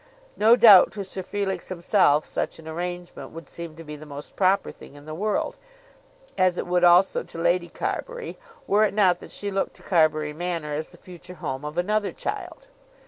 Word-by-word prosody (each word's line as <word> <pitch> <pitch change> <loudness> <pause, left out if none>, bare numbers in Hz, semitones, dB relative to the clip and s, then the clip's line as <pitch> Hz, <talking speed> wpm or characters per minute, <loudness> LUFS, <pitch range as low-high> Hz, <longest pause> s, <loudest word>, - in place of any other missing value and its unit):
No 225 +3 +6
doubt 215 -6 +8
to 205 - -4
Sir 190 0 -6
Felix 190 -1 -3
himself 170 -4 +2
such - - -3
an 160 - -13
arrangement 175 +2 -6
would 165 -2 -11
seem 170 -2 -8
to 165 - -10
be 150 -1 -8
the 150 +1 -12
most 145 0 -8
proper 195 +1 +2
thing - - -15
in 145 0 -14
the 155 - -7
world, 210 +6 -2 0.8
as 185 -1 +3
it - - -2
would 180 0 +1
also 175 +2 +5
to - - -10
Lady 175 +1 +1
Carbury - - -5 0.3
were 210 +2 +3
it 210 - 0
not 185 -4 +3
that - - -12
she 205 0 -4
looked 195 0 -2
to - - -17
Carbury 155 -4 +2
Manor 165 -2 -3
as 155 +2 -4
the - - -17
future 180 -1 -12
home 135 -4 -5
of 150 +2 -6
another 205 +3 0
child. - - -6
175 Hz, 195 wpm, -24 LUFS, 160-195 Hz, 0.8 s, doubt